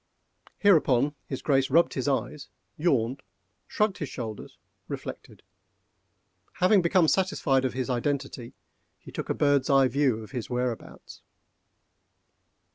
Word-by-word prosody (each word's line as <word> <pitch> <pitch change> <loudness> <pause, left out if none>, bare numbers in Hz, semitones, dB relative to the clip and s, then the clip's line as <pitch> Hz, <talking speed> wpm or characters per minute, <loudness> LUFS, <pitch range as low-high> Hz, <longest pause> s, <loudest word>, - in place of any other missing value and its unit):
Hereupon 145 -8 +3
his 135 - -5
Grace 135 -2 +2
rubbed 165 +5 +3
his 130 0 -3
eyes, 140 +1 -2 0.3
yawned, 135 -5 0 0.5
shrugged 210 -2 0
his 150 - -4
shoulders, 110 -4 -7 0.3
reflected. - - -8 1.1
Having 185 +2 +4
become 170 0 +3
satisfied 160 -8 +1
of 130 - -1
his 130 0 -3
identity, 135 -1 -3 0.4
he - - -14
took - - -6
a - - 0
bird's 145 -2 +2
eye 135 -1 +5
view 130 -4 0
of 110 - -13
his 125 -4 -5
whereabouts. 125 -1 -5
135 Hz, 120 wpm, -27 LUFS, 125-150 Hz, 1.1 s, eye